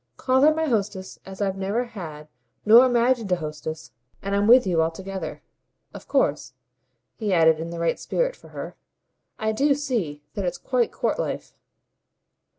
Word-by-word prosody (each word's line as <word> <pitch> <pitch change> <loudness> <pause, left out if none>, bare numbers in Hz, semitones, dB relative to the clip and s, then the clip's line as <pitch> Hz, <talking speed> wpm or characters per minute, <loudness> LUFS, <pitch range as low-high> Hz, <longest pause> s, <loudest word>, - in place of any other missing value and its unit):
Call 260 0 +2
her 300 +2 +7
my 320 +1 0
hostess 205 -7 -2
as 190 +1 -4
I've 195 -1 -2
never 200 +5 0
had 160 -10 -9 0.4
nor 235 +4 +8
imagined 240 -3 +1
a - - +4
hostess, 155 -1 -6 0.3
and 200 0 -2
I'm 200 +1 +2
with 245 +1 +7
you 175 -4 +2
altogether. 190 +4 -4 0.5
Of - - -11
course," - - 0 0.6
he 215 -3 -2
added 160 -3 +4
in 165 +1 -5
the 170 - -6
right 170 0 0
spirit - - -1
for - - -17
her, - - -8 0.6
"I 220 0 0
do 280 +6 +2
see 220 - -3
that 200 - -3
it's 180 -1 -2
quite 250 -3 0
court - - -1
life." - - -4
200 Hz, 165 wpm, -24 LUFS, 170-245 Hz, 0.6 s, nor